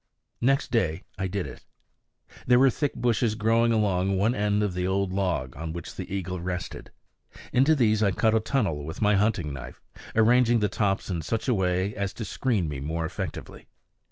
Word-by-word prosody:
Next 135 +4 +2
day 90 -8 0 0.2
I 95 - 0
did 95 0 -3
it. - - -10 0.8
There 125 0 +6
were 135 +1 +5
thick 145 +3 -2
bushes 115 -2 +1
growing 115 +2 +2
along 100 -3 +1
one 105 +5 +2
end 105 -1 +1
of 100 -3 -1
the 90 0 -1
old 95 0 0
log 90 -10 -1
on 80 +3 -5
which 85 -1 -7
the - - -7
eagle 90 -2 -3
rested. 90 -2 -5 0.6
Into 135 +5 +4
these 110 -5 +2
I 105 - +4
cut 110 +3 +2
a 110 - +4
tunnel 105 - -1
with 80 +4 -7
my 105 -1 +3
hunting 100 -7 +1
knife, 65 -2 -9 0.4
arranging 120 +2 +4
the 105 -2 +1
tops 100 -1 -1
in 85 -2 -2
such 115 - -3
a 125 - +3
way 95 0 0
as 100 -2 -2
to 110 - -6
screen 105 - 0
me 75 -2 -4
more 80 +4 -2
effectively. 90 0 -6
100 Hz, 190 wpm, -26 LUFS, 90-115 Hz, 0.8 s, There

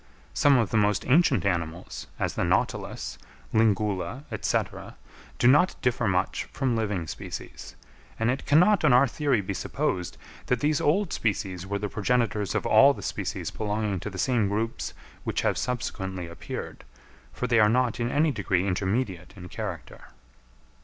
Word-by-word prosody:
Some 145 -2 +4
of 115 -5 +1
the 115 - +2
most 105 -1 +2
ancient 140 - +3
animals, 85 -2 -3
as - - -1
the - - -1
Nautilus, - - -1 0.3
Lingula, 105 +2 +1 0.2
&c., - - +3 0.8
do 120 - +3
not 150 +8 +5
differ 125 -3 +1
much 90 -1 0
from 130 -3 -1
living 105 -6 -1
species; - - -8 0.4
and 115 +2 +2
it 130 - -4
cannot 180 +6 +5
on 150 -5 +5
our 130 +3 +6
theory 135 -3 0
be 95 - -4
supposed, 90 -1 -2 0.3
that 125 - +1
these 150 +2 +1
old 180 +5 +1
species 95 -4 -2
were 100 +1 -1
the 105 +1 -3
progenitors 105 -3 0
of - - -1
all - - +6
the - - -9
species - - -3
belonging 105 -2 -2
to 105 - -5
the 95 - -9
same 120 -2 +1
groups 110 +3 -3 0.3
which - - -1
have - - +1
subsequently 95 -7 -3
appeared, 85 0 -7 0.5
for - - -4
they 120 -1 +3
are 105 -1 +6
not 125 0 +1
in 120 0 0
any 150 +4 +2
degree 95 -6 0
intermediate 95 -1 -2
in 90 -2 -9
character. 95 -4 -7
110 Hz, 160 wpm, -26 LUFS, 95-125 Hz, 0.8 s, our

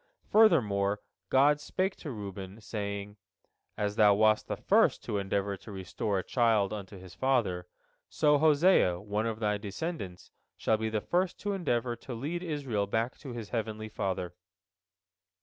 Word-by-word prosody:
Furthermore 105 - +4 0.3
God 145 +3 +4
spake 185 +5 -1
to 155 - -7
Reuben, 100 -3 -7
saying: 100 -1 -5 0.6
"As 105 0 -1
thou 105 -2 +6
wast 110 +1 +3
the - - -3
first - - +3
to 105 - -2
endeavor 100 0 -1
to 110 - -12
restore 100 +2 -2
a 95 - -1
child 110 -5 +2
unto 100 -1 -7
his 90 -1 -12
father, 100 -7 0 0.4
so 150 -2 +3
Hosea, 155 - +4
one 105 +3 -2
of 110 -1 -3
thy 105 -2 0
descendants, 100 - -5 0.3
shall 110 - +2
be 110 0 -2
the 110 -1 -1
first 180 - 0
to 205 -1 -1
endeavor 125 -10 -1
to 120 +1 -7
lead 155 +9 -3
Israel 135 - -2
back 115 +4 -1
to 135 -5 -8
his 115 -3 -6
heavenly 110 -2 -3
Father." 95 -4 -3
110 Hz, 155 wpm, -30 LUFS, 100-135 Hz, 0.6 s, thou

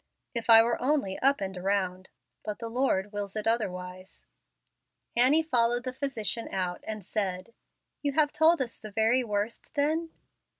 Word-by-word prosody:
If 235 -1 -4
I 225 0 +10
were 235 +1 -1
only 255 -8 0
up 275 -1 +3
and 190 0 -3
around; 185 0 -2 0.3
but 210 -1 -4
the 230 -1 -6
Lord 225 -5 0
wills 205 -1 -5
it 215 - -2
otherwise." 185 -5 -3 0.9
Annie 265 +7 +5
followed 240 -4 +1
the 255 0 -4
physician 240 -4 -2
out 180 -2 -3
and 215 -3 -5
said, 190 +1 -3 0.5
"You 285 -1 -1
have 295 0 +3
told 320 -2 +4
us 235 - -11
the 215 - -8
very 225 +4 +2
worst 210 +5 -4
then?" 315 +3 0
225 Hz, 160 wpm, -28 LUFS, 195-260 Hz, 0.9 s, I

